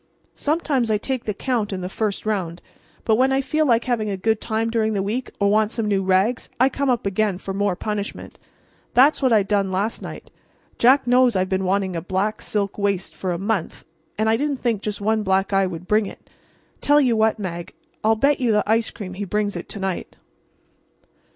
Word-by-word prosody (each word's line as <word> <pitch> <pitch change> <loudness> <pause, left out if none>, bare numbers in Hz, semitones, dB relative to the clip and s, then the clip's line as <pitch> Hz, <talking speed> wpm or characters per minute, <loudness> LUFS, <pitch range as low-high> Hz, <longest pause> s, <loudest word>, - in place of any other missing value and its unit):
Sometimes 290 -6 0
I 215 - +3
take 255 +3 -4
the 210 - -1
count 230 -3 -1
in 190 -1 -3
the 180 - -3
first 205 +2 -3
round; 185 -6 -2 0.5
but 220 -1 +3
when 260 +2 +3
I 270 - +2
feel 305 +3 0
like 235 -2 +3
having 230 -4 -1
a 195 - -2
good 220 +3 0
time 225 0 -1
during 220 -1 +1
the 195 -2 0
week 230 +6 -3
or 200 -1 +3
want 215 0 +2
some 225 -2 -2
new 200 -2 +1
rags 190 +5 +1
I 260 +2 +5
come 275 0 -1
up 240 -4 +1
again 200 -1 0
for 195 0 -6
more 200 -1 0
punishment. 210 +1 -5 0.6
That's 275 +5 +5
what 260 -2 +3
I 215 -3 +5
done 195 -1 0
last 200 +4 -1
night. - - -9 0.5
Jack 260 +3 +5
knows 245 -1 +4
I've 185 0 +1
been 190 0 0
wanting 190 -1 0
a 165 - -2
black 195 +4 -2
silk 200 -1 -2
waist 200 -2 -1
for 185 - -3
a 175 - -1
month, 195 -1 -3 0.3
and 220 +1 +1
I 220 0 +3
didn't 290 0 -1
think 230 -5 -1
just 210 -1 -4
one 220 +1 +1
black 195 0 +1
eye 195 -1 +3
would 180 0 -7
bring 210 -1 +2
it. - - -13 0.5
Tell 290 +1 +5
you 250 -5 +3
what, 220 0 +2
Mag, 175 -4 -6 0.3
I'll 220 +1 +4
bet 280 +6 +2
you 245 -3 +2
the 210 -1 +3
ice 225 +1 +2
cream 190 -4 -8
he 195 +2 -5
brings 205 0 -1
it 175 - -6
to 205 - -6
night." 190 -2 -4
215 Hz, 215 wpm, -22 LUFS, 195-235 Hz, 0.6 s, I